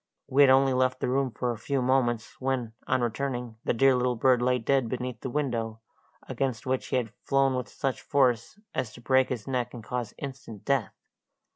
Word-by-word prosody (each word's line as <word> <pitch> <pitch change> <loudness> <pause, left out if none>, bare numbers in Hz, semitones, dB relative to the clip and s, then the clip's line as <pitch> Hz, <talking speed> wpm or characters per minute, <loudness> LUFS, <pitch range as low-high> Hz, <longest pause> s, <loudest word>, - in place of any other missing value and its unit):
We 140 +1 +3
had 140 - +8
only 135 0 +5
left 130 0 +1
the - - -1
room 135 +1 +1
for 120 +2 -2
a 115 - -6
few 140 +4 -1
moments, 125 -3 0
when, 130 -4 -1
on 130 - +2
returning, 120 -1 -2
the - - +2
dear 135 +3 +4
little 125 0 +1
bird 125 +1 +3
lay 125 +1 +3
dead 125 0 +1
beneath 125 -2 -4
the 130 - -4
window, 120 -5 -2 0.5
against 130 -5 -2
which 130 0 -1
he - - -1
had 115 -4 -1
flown 135 -1 +2
with 125 -1 -3
such 135 -2 -3
force 125 - +1
as 125 -4 -2
to - - -12
break 130 +1 +3
his 120 -5 -4
neck 125 -2 -2
and 115 - -8
cause 120 -1 -4
instant 130 -7 -8
death. 135 -6 0
125 Hz, 205 wpm, -28 LUFS, 120-135 Hz, 0.5 s, had